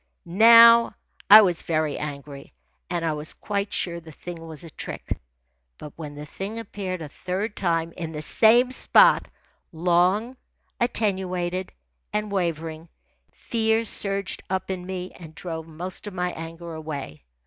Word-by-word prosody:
Now 230 +5 +7 0.3
I 215 +2 +11
was 175 -4 +1
very 155 -2 -1
angry, 140 -1 -7 0.4
and 170 -1 -2
I 160 - 0
was 150 +1 -4
quite 200 -1 -3
sure 170 -1 -2
the 160 -1 -13
thing 165 +2 -9
was 160 -1 -8
a 165 - -10
trick; - - -5 0.6
but 150 - -10
when 150 -3 -8
the 145 +1 -8
thing 195 +8 -6
appeared 195 -5 -5
a - - -6
third 190 +8 -4
time, 165 -3 -1
in 165 -3 -5
the 150 -1 -5
same 240 +8 +4
spot, - - +4 0.4
long, 180 +8 +1 0.4
attenuated, 185 -5 -1 0.4
and 210 0 -2
wavering, 165 -3 -3 0.4
fear 225 0 0
surged 200 -2 0
up 190 0 -2
in 180 -1 -5
me 185 -1 -5
and 160 -2 -12
drove 160 -2 -6
most 175 +5 -7
of 200 - -7
my 180 0 -1
anger 165 +1 -8
away. 145 - -7
180 Hz, 150 wpm, -24 LUFS, 160-200 Hz, 0.6 s, I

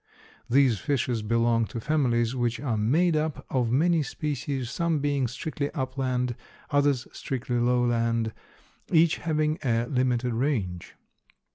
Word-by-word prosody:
These 125 -4 +4
fishes 120 -2 -1
belong 115 +1 +2
to 115 - -5
families 125 -4 +1
which 120 -2 -1
are 130 -4 -1
made 155 +11 +2
up 155 -1 -2
of 125 -3 +1
many 165 +5 +3
species, 140 -3 -3
some 170 +1 0
being 140 -3 0
strictly 140 +4 -4
upland, 130 -3 -1 0.4
others 145 -3 +2
strictly 125 -2 -3
lowland, 115 -2 +1 0.6
each 165 -1 +4
having 155 -1 0
a 115 -3 +1
limited 125 -2 0
range. 115 - -2
130 Hz, 125 wpm, -27 LUFS, 120-145 Hz, 0.6 s, These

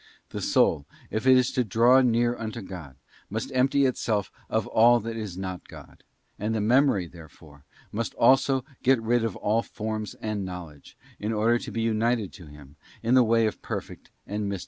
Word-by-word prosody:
The - - -6
soul, 70 - +2 0.2
if 110 +4 -2
it 130 0 +7
is 125 0 +2
to 125 - +1
draw 120 +5 +4
near 120 -1 +2
unto 110 -1 -6
God, 85 -9 -9 0.3
must 110 +6 -4
empty 135 +2 +3
itself 110 -5 -1 0.2
of - - 0
all 120 +2 +5
that 115 +1 -5
is 105 -5 -6
not 95 -1 -6
God; - - -14 0.4
and 110 +2 -1
the - - 0
memory, 115 -3 +3
therefore, 80 -3 -15 0.3
must 110 +1 -3
also 130 +1 +3 0.2
get 130 -1 +3
rid 115 +1 +1
of 115 - -2
all 110 +2 +1
forms 110 -2 -5
and 110 -2 -4
knowledge, 85 -6 -9 0.2
in 105 +2 -2
order 115 +2 +2
to - - -7
be 115 - -2
united 115 -1 0
to 85 -5 -12
Him 75 0 -15 0.3
in 115 +2 +1
the 130 - +7
way 115 0 +3
of 110 - -3
perfect - - -7 0.2
and 105 0 -3
mystical - - -2
Hope. 95 - -4
110 Hz, 190 wpm, -26 LUFS, 100-120 Hz, 0.4 s, it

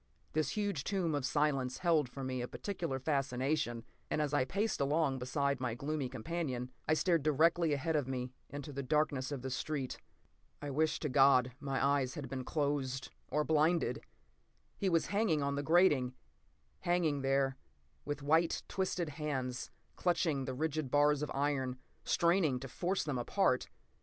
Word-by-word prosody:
This 155 +3 0
huge 200 -9 -1
tomb 185 -4 0
of 145 -3 0
silence 135 -4 +1
held 160 -7 +2
for 135 +2 -7
me 130 -1 -2
a 120 - -3
peculiar 170 -7 -3
fascination, 135 -2 0 0.3
and - - 0
as 150 -1 0
I 145 -3 +3
paced 200 +5 -1
along 140 -1 +1
beside 140 +2 0
my 120 -3 -1
gloomy 140 0 -2
companion, 130 -3 -3 0.2
I 155 - +4
stared 170 -1 +2
directly 160 +3 +3
ahead 160 +3 0
of 145 -4 +1
me 125 -1 -3 0.2
into 145 0 -7
the 140 - -3
darkness 140 -1 0
of 135 -3 -4
the 130 - -3
street. 135 -1 -3 0.6
I 145 -1 -5
wish 155 +3 +1
to 150 - 0
God 130 -1 +5
my 135 -2 0
eyes 140 -2 +1
had 140 -4 -5
been 130 -1 -4
closed 140 -3 -1 0.2
or 150 - +1
blinded! 160 +2 +2 0.7
He 195 - 0
was 165 -2 +2
hanging 200 -8 +2
on 140 0 0
the 140 - -1
grating. 145 -6 +4 0.6
Hanging 170 -5 +1
there, 135 0 +1 0.5
with 145 -1 -4
white, 160 +3 +2
twisted 180 -3 -1
hands 135 -4 -3 0.3
clutching 165 -6 +1
the 130 - -4
rigid 155 0 -1
bars 145 +1 +4
of 150 - -2
iron, 135 -2 0 0.3
straining 170 -6 +3
to 135 - -5
force 180 +9 -1
them 140 -5 -2
apart. 120 - +1
145 Hz, 165 wpm, -34 LUFS, 130-160 Hz, 0.7 s, God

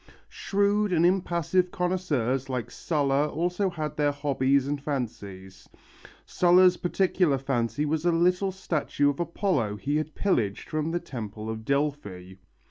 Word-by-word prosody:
Shrewd 205 +1 0
and 170 0 +3
impassive 180 0 +1
connoisseurs 145 -9 -1
like 120 -3 -3
Sulla 145 -2 0
also 180 +5 -1
had 155 -4 -5
their 145 -1 +2
hobbies 140 -1 +1
and 145 0 -2
fancies. 105 -9 -6 0.6
Sulla's 180 0 +5
particular 175 -4 +1
fancy 130 0 -1
was 155 +1 -1
a 175 - +3
little 180 +3 +2
statue 155 -6 0
of 140 - -10
Apollo 170 - -1
he 145 +7 -1
had 155 0 -4
pillaged 115 - 0
from 155 0 -1
the 175 +1 -1
temple 110 -6 -6
of 110 0 -6
Delphi. 140 -11 -2
150 Hz, 135 wpm, -26 LUFS, 130-175 Hz, 0.6 s, Sulla's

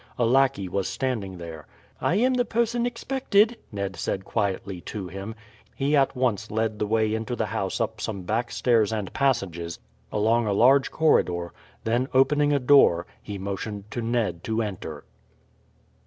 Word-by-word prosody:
A 120 - +2
lackey 130 -4 +3
was 95 +1 -1
standing 110 -8 -3
there. 85 -2 -9 0.3
"I 175 - +1
am 250 +5 +3
the 250 -1 +2
person 235 +1 0
expected," 235 -3 +1
Ned 100 -2 -3
said 95 +2 -3
quietly 100 -3 -2
to 95 -4 -5
him. 100 +4 -6 0.4
He 140 +2 +1
at 140 -1 +3
once 115 -5 0
led 110 0 -1
the 105 - 0
way 110 0 +1
into 110 +2 -2
the 115 - -1
house 95 0 -2
up 110 -2 -2
some 105 -4 -4
back 115 +6 -1
stairs 115 -1 +2
and 105 -5 -3
passages, 95 - 0 0.3
along 110 +2 +2
a 100 - +1
large 130 +6 +5
corridor, 90 - +1 0.3
then 120 +3 +1
opening 145 +2 +4
a 145 - +4
door, 125 -10 +5 0.2
he 100 -1 -6
motioned 100 +2 -5
to 120 - -3
Ned 115 -7 -1
to 110 0 0
enter. 85 -7 -6
110 Hz, 165 wpm, -25 LUFS, 100-135 Hz, 0.4 s, large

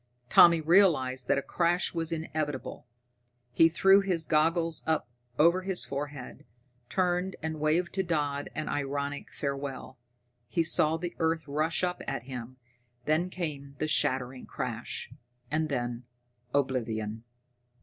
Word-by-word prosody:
Tommy 170 -1 +7
realized 150 -7 +3
that - - +3
a 140 - -1
crash 175 +1 0
was 165 -1 -1
inevitable. 155 -6 -4 0.6
He 165 +6 +5
threw 195 +4 +5
his 180 -5 -1
goggles 165 +1 +1
up 160 -1 +1 0.3
over 170 +4 +5
his 190 -1 -1
forehead, 140 -1 -6 0.5
turned 180 0 0
and 160 -1 -3
waved 160 +4 +1
to 190 - +1
Dodd 145 -5 -1
in 155 - -3
ironic 140 0 -3
farewell. 140 -2 -5 0.5
He 170 - +1
saw 160 -1 +4
the 175 +1 -5
earth 160 -1 0
rush 155 +5 0
up 180 0 -1
at - - -3
him 125 -1 -8 0.5
then 160 +4 +1
came 145 -6 -5
the 155 - -1
shattering 130 -3 0
crash, - - -5 0.4
and 155 0 0
then 120 -2 -3 0.5
oblivion! 115 -5 -1
155 Hz, 130 wpm, -29 LUFS, 140-170 Hz, 0.6 s, Tommy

